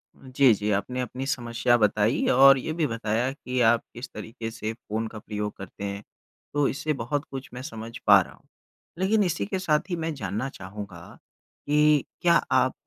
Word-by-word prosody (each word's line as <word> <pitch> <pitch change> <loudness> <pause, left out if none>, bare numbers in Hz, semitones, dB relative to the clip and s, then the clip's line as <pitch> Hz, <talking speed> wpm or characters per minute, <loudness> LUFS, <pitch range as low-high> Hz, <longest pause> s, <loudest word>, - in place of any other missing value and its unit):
जी, 130 -1 +3
जी 105 0 -2
आपने 115 +6 -1
अपनी 125 +1 -4
समस्या 120 -2 +1
बताई 105 +3 +2
और 135 +1 +8
ये 135 - -4
भी 160 -1 0
बताया 115 +2 -1
कि 130 -2 -4
आप 115 0 +4
किस 120 +2 -7
तरीके 115 0 -6
से 110 -1 -4
फ़ोन 110 0 -4
का 110 -1 -9
प्रयोग 105 -1 -4
करते 100 +1 -9
हैं। 100 0 -4 0.5
तो 145 -1 +2
इससे 150 +3 -1
बहुत 145 +5 -2
कुछ 135 -1 -6
मैं 125 - -6
समझ 115 -3 -7 0.2
पा - - +9
रहा - - -9
हूँ। - - -24 0.5
लेकिन 205 +3 +3
इसी 155 - -1
के 185 - -3
साथ 155 -1 0
ही 175 - 0
मैं 165 -1 -3
जानना 130 0 -3
चाहूँगा 95 -4 -9 0.5
कि 150 -1 +4 0.2
क्या 170 -1 +4 0.2
आप - - +3
120 Hz, 185 wpm, -26 LUFS, 110-140 Hz, 0.5 s, पा